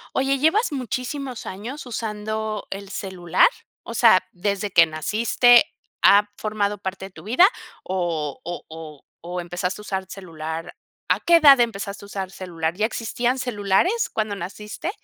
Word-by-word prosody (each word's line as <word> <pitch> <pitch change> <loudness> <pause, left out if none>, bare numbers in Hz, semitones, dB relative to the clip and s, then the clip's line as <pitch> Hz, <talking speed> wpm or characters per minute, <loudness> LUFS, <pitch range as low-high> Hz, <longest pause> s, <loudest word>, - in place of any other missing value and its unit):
Oye, 270 +1 +1
¿llevas 320 - +2
muchísimos 255 0 -4
años 235 +10 -7
usando 215 -2 -4
el 195 0 -6
celular? 185 -3 +2 0.4
O 230 - -7
sea, 225 -5 +6
¿desde 200 +2 -2
que 170 - +7
naciste 225 - +4 0.4
ha 205 +1 +6
formado 210 -1 -2
parte 190 0 -5
de - - -13
tu 160 - -13
vida 245 - +5 0.4
o 170 -6 -2
o 175 +1 -6
o 160 -2 -10 0.2
o 175 +1 -5
empezaste 180 +3 -4
a - - -9
usar 190 -2 -4
celular? 165 -2 -7 0.3
¿A - - +2
qué 340 - +5
edad 280 -6 +8
empezaste 200 -3 -2
a - - -10
usar 195 -2 -5
celular? 170 -3 -3
¿Ya 215 +3 +1
existían 240 +3 -2
celulares 245 - +1
cuando 215 -2 -1
naciste? 210 - -6
205 Hz, 150 wpm, -23 LUFS, 180-235 Hz, 0.4 s, edad